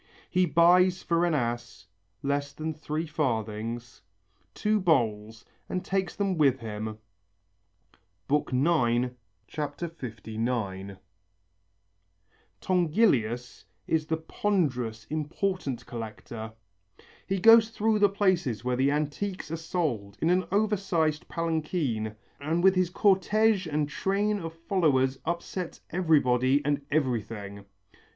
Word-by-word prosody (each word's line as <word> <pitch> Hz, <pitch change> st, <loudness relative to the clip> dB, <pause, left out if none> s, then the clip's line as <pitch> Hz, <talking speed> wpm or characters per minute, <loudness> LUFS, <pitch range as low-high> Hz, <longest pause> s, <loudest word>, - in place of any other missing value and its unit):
He 180 Hz, 0 st, +3 dB
buys 175 Hz, +4 st, +4 dB
for 170 Hz, 0 st, +2 dB
an 165 Hz, -, +1 dB
as 120 Hz, -7 st, -3 dB, 0.4 s
(less 140 Hz, 0 st, -1 dB
than 155 Hz, +1 st, -4 dB
three 155 Hz, +1 st, -3 dB
farthings) 115 Hz, -5 st, -3 dB, 0.5 s
two 215 Hz, 0 st, +1 dB
bowls 115 Hz, -, 0 dB, 0.2 s
and 185 Hz, -, -3 dB
takes 190 Hz, -1 st, -1 dB
them 195 Hz, -4 st, -1 dB
with 135 Hz, -4 st, +4 dB
him" 110 Hz, -1 st, -5 dB, 1.3 s
(IX, 125 Hz, -4 st, +2 dB, 0.3 s
59). 115 Hz, -, -4 dB, 1.6 s
Tongilius 150 Hz, -, +1 dB, 0.2 s
is 155 Hz, -1 st, 0 dB
the 160 Hz, -, 0 dB
ponderous, 135 Hz, -, -1 dB
important 155 Hz, -2 st, -2 dB
collector. 110 Hz, -1 st, -7 dB, 0.8 s
He 195 Hz, -, 0 dB
goes 225 Hz, +2 st, +7 dB
through 220 Hz, -1 st, +1 dB
the 205 Hz, -1 st, +5 dB
places 180 Hz, -, +1 dB
where 125 Hz, 0 st, +1 dB
the 135 Hz, +2 st, +2 dB
antiques 155 Hz, +5 st, -2 dB
are -, -, -1 dB
sold 155 Hz, -, -3 dB
in 165 Hz, -, +2 dB
an 185 Hz, +1 st, +2 dB
over 210 Hz, +1 st, +2 dB
sized 160 Hz, -5 st, 0 dB
palanquin 155 Hz, -, -2 dB, 0.2 s
and 160 Hz, +4 st, -1 dB
with 190 Hz, 0 st, +7 dB
his 185 Hz, -2 st, +1 dB
cortège 195 Hz, 0 st, +2 dB
and 150 Hz, 0 st, +1 dB
train 200 Hz, +6 st, 0 dB
of 165 Hz, -2 st, -6 dB
followers 135 Hz, -8 st, +2 dB
upsets 170 Hz, +1 st, -4 dB
everybody 140 Hz, -5 st, +3 dB
and 145 Hz, -1 st, 0 dB
everything. 110 Hz, -8 st, -2 dB
150 Hz, 110 wpm, -28 LUFS, 120-180 Hz, 1.6 s, goes